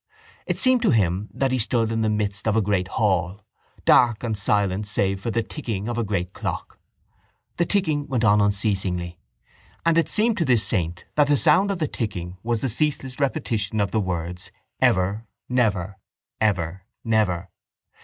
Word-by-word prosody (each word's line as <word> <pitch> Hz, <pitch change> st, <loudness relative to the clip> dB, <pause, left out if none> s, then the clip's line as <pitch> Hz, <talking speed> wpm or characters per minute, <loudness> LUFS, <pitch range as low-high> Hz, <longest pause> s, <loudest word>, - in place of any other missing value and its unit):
It -, -, -1 dB
seemed 255 Hz, -2 st, +4 dB
to -, -, +3 dB
him 100 Hz, -2 st, +1 dB
that 135 Hz, -1 st, 0 dB
he 130 Hz, -, +1 dB
stood 115 Hz, 0 st, +1 dB
in 115 Hz, 0 st, 0 dB
the 110 Hz, -, +1 dB
midst 105 Hz, -1 st, -2 dB
of 110 Hz, -, +2 dB
a 110 Hz, -, +3 dB
great 95 Hz, -2 st, 0 dB
hall, 95 Hz, 0 st, 0 dB, 0.4 s
dark 120 Hz, -3 st, +4 dB
and 115 Hz, -2 st, -1 dB
silent 100 Hz, 0 st, 0 dB
save 95 Hz, -2 st, 0 dB
for 115 Hz, -, -3 dB
the 115 Hz, 0 st, 0 dB
ticking 110 Hz, -9 st, -5 dB
of 120 Hz, -, -2 dB
a -, -, +1 dB
great 95 Hz, -3 st, -2 dB
clock. -, -, -5 dB, 0.8 s
The 170 Hz, -, +1 dB
ticking 155 Hz, -8 st, 0 dB
went 125 Hz, -4 st, -1 dB
on 105 Hz, -1 st, +5 dB
unceasingly; 95 Hz, -4 st, -1 dB, 0.7 s
and 165 Hz, 0 st, +4 dB
it 165 Hz, -, 0 dB
seemed 220 Hz, 0 st, +2 dB
to 170 Hz, -, +2 dB
this 120 Hz, -5 st, +3 dB
saint 85 Hz, -4 st, -2 dB
that 150 Hz, -1 st, +3 dB
the 145 Hz, 0 st, +3 dB
sound 175 Hz, +7 st, +4 dB
of 200 Hz, -, -1 dB
the 155 Hz, -3 st, -1 dB
ticking 90 Hz, -8 st, -4 dB
was 115 Hz, 0 st, -1 dB
the -, -, 0 dB
ceaseless 135 Hz, 0 st, -1 dB
repetition 115 Hz, -7 st, -1 dB
of 100 Hz, -1 st, 0 dB
the 110 Hz, -, +1 dB
words: 90 Hz, -1 st, -4 dB, 0.3 s
ever, 100 Hz, +5 st, +1 dB, 0.2 s
never; 100 Hz, -6 st, 0 dB, 0.4 s
ever, 95 Hz, -4 st, 0 dB, 0.2 s
never. 95 Hz, -6 st, 0 dB
105 Hz, 175 wpm, -23 LUFS, 95-125 Hz, 0.8 s, on